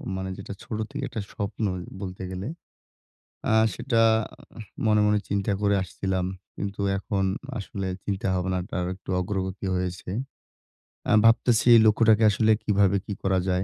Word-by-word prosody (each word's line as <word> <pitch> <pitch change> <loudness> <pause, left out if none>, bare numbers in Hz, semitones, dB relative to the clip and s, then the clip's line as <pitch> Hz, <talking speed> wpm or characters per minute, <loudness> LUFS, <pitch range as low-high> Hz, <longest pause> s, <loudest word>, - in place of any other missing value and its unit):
মানে 95 0 -4
যেটা 100 0 -7
ছোট 110 - -5
থেকে - - -4
একটা 110 - -4
স্বপ্ন 105 +2 -4 0.4
বলতে 95 0 -6
গেলে। 95 +3 -5 1.0
আ - - +3 0.2
সেটা 120 -4 0 0.9
মনে, 105 -1 +4
মনে 105 0 +3
চিন্তা 100 0 0
করে 100 0 +3
আসছিলাম। 95 0 -2 0.3
কিন্তু 100 0 -4 0.2
এখন 95 0 -1 0.3
আসলে 100 -1 -5 0.2
চিন্তাভাবনাটা 95 -2 -2
আরেকটু 90 +1 -6
অগ্রগতি 95 +1 -3
হয়েছে। 90 0 -3 1.0
আ - - +3
ভাবতেছি 115 0 +4
এই - - +8
লক্ষ্যটাকে 110 +1 +5
আসলে 110 +2 +3
কিভাবে 100 -1 +3
কি 105 - -4
করা 95 -1 +2
যায়। 90 0 +1
100 Hz, 135 wpm, -26 LUFS, 95-105 Hz, 1.0 s, এই